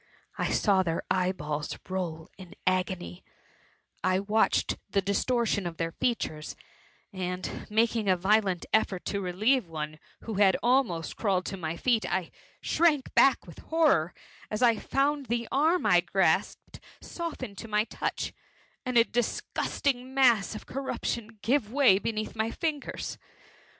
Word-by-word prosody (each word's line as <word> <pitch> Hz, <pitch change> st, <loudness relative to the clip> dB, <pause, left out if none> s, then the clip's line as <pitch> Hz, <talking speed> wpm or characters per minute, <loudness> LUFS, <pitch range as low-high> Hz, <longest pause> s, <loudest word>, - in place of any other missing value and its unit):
I -, -, 0 dB
saw 195 Hz, -3 st, +3 dB
their 165 Hz, -3 st, -2 dB
eye 185 Hz, 0 st, +2 dB
balls 150 Hz, -4 st, -4 dB
roll 175 Hz, -4 st, -4 dB
in 190 Hz, 0 st, -12 dB
agony 185 Hz, -, -1 dB, 0.8 s
^I 185 Hz, +2 st, +1 dB
watched 220 Hz, +1 st, +2 dB
the 195 Hz, -, +2 dB
distortion 200 Hz, 0 st, 0 dB
of 165 Hz, -1 st, -7 dB
their 165 Hz, 0 st, -2 dB
features, 170 Hz, -9 st, -2 dB, 0.6 s
and, 180 Hz, -1 st, -4 dB
making 220 Hz, -1 st, +1 dB
a 185 Hz, -, +4 dB
violent 190 Hz, -1 st, +2 dB
effort 195 Hz, -4 st, +1 dB
to 200 Hz, -, -2 dB
relieve 210 Hz, +6 st, +1 dB
one 155 Hz, -1 st, -5 dB, 0.2 s
who 225 Hz, -, -5 dB
had 190 Hz, -2 st, +5 dB
almost 240 Hz, -10 st, +1 dB
crawled 190 Hz, -4 st, +1 dB
to 195 Hz, -, -4 dB
my 165 Hz, -2 st, -4 dB
feet, 235 Hz, 0 st, +2 dB
I 185 Hz, -3 st, -1 dB, 0.3 s
shrank 310 Hz, -5 st, +2 dB
back 270 Hz, -, +4 dB
with 170 Hz, -, -12 dB
horror 300 Hz, -, +2 dB, 0.3 s
as 215 Hz, +3 st, -1 dB
I 230 Hz, -2 st, +5 dB
found 280 Hz, +2 st, 0 dB
the 235 Hz, -1 st, -1 dB
arm 320 Hz, +6 st, +2 dB
I -, -, +5 dB
grasped -, -, 0 dB, 0.2 s
soften 335 Hz, -, -6 dB
to 225 Hz, -, -7 dB
my 210 Hz, 0 st, +2 dB
touch, -, -, -3 dB, 0.5 s
and 255 Hz, -2 st, 0 dB
a 230 Hz, -, +8 dB
disgusting 250 Hz, +2 st, -2 dB
mass 235 Hz, -6 st, +4 dB
of -, -, -8 dB
corruption 235 Hz, -4 st, -4 dB
give 230 Hz, -2 st, +1 dB
way 255 Hz, -8 st, +5 dB
beneath 215 Hz, 0 st, -3 dB
my 220 Hz, 0 st, 0 dB
fingers 300 Hz, +2 st, -4 dB
210 Hz, 145 wpm, -28 LUFS, 185-245 Hz, 0.8 s, a